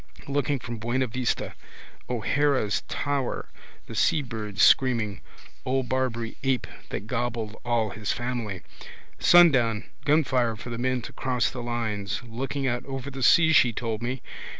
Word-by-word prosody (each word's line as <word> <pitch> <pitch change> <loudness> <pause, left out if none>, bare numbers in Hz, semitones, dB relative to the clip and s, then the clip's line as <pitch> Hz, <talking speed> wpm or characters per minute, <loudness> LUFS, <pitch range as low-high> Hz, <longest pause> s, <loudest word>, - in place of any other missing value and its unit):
Looking 140 0 0
from 120 -2 -6
Buena 120 +4 0
Vista. 125 +1 -2 0.6
O'Hara's 125 -2 +1
tower. 140 -3 -2 0.4
The - - -9
seabirds 110 -8 0
screaming. 115 -7 +4 0.4
Old 130 -1 -1
Barbary 120 -3 -1
ape 130 -2 +1 0.2
that 100 - -4
gobbled 115 -2 -2
all 115 -3 0
his 105 -1 -3
family. 120 -7 -3 0.6
Sundown, 130 -11 +5 0.2
gunfire 130 -6 +2
for 120 +3 -8
the 115 - -4
men 130 -1 0
to - - -8
cross 125 -3 0
the 125 - -6
lines. 115 -4 -3
Looking 135 +4 -4
out 120 -1 -1
over 135 0 -5
the 135 0 -7
sea 160 +6 +6
she 120 -5 +5
told 110 -1 -3
me. 125 +2 -3
120 Hz, 140 wpm, -26 LUFS, 115-130 Hz, 0.6 s, sea